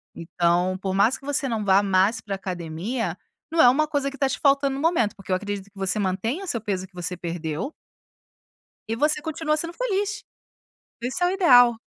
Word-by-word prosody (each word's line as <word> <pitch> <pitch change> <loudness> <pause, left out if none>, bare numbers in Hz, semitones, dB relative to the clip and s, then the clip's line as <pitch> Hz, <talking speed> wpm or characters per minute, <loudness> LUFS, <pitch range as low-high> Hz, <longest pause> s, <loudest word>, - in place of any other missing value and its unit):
então, 175 +2 0
por 190 0 -3
mais 210 +6 +3
que 275 - -17
você 285 -1 0
não 220 -3 -2
vá 195 +1 +4
mais 195 +3 +2
pra 200 -2 -4
academia, 185 +5 -4 0.3
não 330 - +4
é 245 - +8
uma 305 +4 +2
coisa 285 -2 -1
que 280 - -11
tá 275 -1 +1
te - - -3
faltando 275 -1 +3
no 275 - -4
momento. 320 - +2
Porque 195 -1 -16
eu - - +4
acredito 205 0 -4
que 200 0 -22
você 195 +2 0
mantenha 210 - -1
o - - -11
seu 235 -9 -1
peso 190 -3 -3
que 190 - -38
você 180 0 -4
perdeu 170 - -4 1.2
e 225 - -1
você 300 +3 +2
continua 310 -1 -1
sendo 335 +2 -3
feliz, 420 -2 -2 0.8
isso 260 +8 -3
é - - +4
o - - 0
ideal. 245 - +6
225 Hz, 205 wpm, -24 LUFS, 190-285 Hz, 1.2 s, é